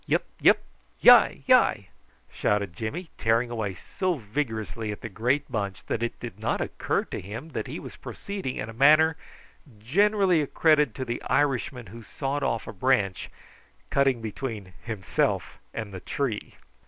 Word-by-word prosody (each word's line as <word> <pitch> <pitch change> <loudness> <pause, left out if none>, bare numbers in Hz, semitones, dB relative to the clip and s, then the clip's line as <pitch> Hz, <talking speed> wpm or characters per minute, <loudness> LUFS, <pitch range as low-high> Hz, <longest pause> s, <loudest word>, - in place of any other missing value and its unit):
"Yup, - - +2 0.2
yup! - - +7 0.5
hyi, - - +7
hyi!" - - +4 0.4
shouted 100 -4 0
Jimmy, 155 - -5
tearing 115 +2 +2
away 105 -5 -3
so 185 - -2
vigorously 110 -3 -3
at 105 - -7
the 115 - -5
great 125 +8 0
bunch 100 -4 -3
that 115 - -2
it 120 - -3
did - - -8
not - - -1
occur - - -1
to - - -6
him 115 - -7
that 110 -8 -4
he - - -5
was - - -9
proceeding 195 -10 -5
in 110 - -4
a 115 - -8
manner 155 +6 +5 0.6
generally 190 - +3
accredited 150 +1 +3
to 130 - -4
the 120 0 -3
Irishman 135 -3 0
who 115 +4 -11
sawed 135 +5 -3
off 115 - -1
a - - -6
branch, 100 -3 +1 0.6
cutting 135 -4 +2
between 110 -4 -5
himself 105 -7 -1
and 110 -3 -6
the 95 - -5
tree. 115 +1 -3
120 Hz, 155 wpm, -26 LUFS, 110-145 Hz, 0.6 s, yup